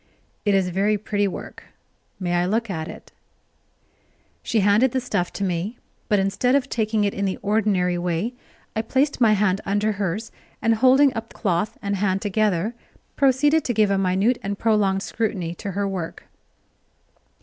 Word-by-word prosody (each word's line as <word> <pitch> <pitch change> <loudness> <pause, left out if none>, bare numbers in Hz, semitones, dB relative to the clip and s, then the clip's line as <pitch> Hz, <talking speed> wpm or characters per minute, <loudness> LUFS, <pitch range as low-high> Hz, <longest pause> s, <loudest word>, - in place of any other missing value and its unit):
"It 205 -1 +3
is 190 -2 +2
very 200 +4 +1
pretty 205 0 -1
work 190 - -8 0.5
may 175 -2 -2
I 175 0 +2
look 220 +2 0
at 160 -3 -4
it?" - - -11 1.3
She 225 - 0
handed 210 +6 +3
the 260 - +1
stuff 205 -8 -2
to 200 - -3
me, 190 +5 -2 0.3
but 210 - +4
instead 200 +7 +1
of 280 -2 +1
taking 220 -2 0
it 200 - 0
in 200 - -2
the 190 - -1
ordinary 195 -4 +1
way, 175 +7 -1 0.4
I 220 - +1
placed 265 +5 0
my 220 -3 +6
hand 200 -1 +1
under 205 +2 0
hers, 205 +2 -3 0.3
and, 230 - +2
holding 260 +4 +5
up 225 0 -6
cloth 200 +2 -1
and 200 0 -1
hand 190 -1 +1
together, 210 0 0 0.4
proceeded 290 +3 +3
to 240 - -2
give 210 -2 +3
a 195 - +2
minute 195 +6 +2
and 200 0 -3
prolonged 200 -3 +2
scrutiny 195 -8 -2
to 195 +3 -6
her 200 +1 -1
work. 185 -4 -5
205 Hz, 170 wpm, -23 LUFS, 190-225 Hz, 1.3 s, my